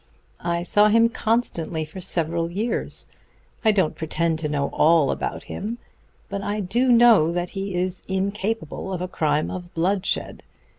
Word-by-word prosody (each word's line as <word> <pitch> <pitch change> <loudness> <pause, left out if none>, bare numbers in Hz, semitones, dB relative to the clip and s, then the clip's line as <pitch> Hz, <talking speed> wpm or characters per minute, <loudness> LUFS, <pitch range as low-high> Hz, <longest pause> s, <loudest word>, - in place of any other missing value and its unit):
I 170 0 -1
saw 205 +4 +4
him 230 +2 +5
constantly 215 -9 -1
for 170 +5 -9
several 170 -2 -1
years. 210 +7 -2 0.6
I 220 - +5
don't 190 -7 +1
pretend 160 0 -1
to 155 -2 -2
know 140 -1 -1
all 160 -3 +4
about - - -3
him; 220 +4 -5 0.5
but 200 - -4
I 205 +1 -2
do 240 +7 +1
know 230 -9 +6
that 175 0 -2
he 195 -1 -4
is 180 +1 0
incapable 195 -1 -2
of 180 -2 -3
a - - -2
crime 155 -4 0
of 180 -1 -7
bloodshed. 190 +4 -1
185 Hz, 155 wpm, -23 LUFS, 165-210 Hz, 0.6 s, know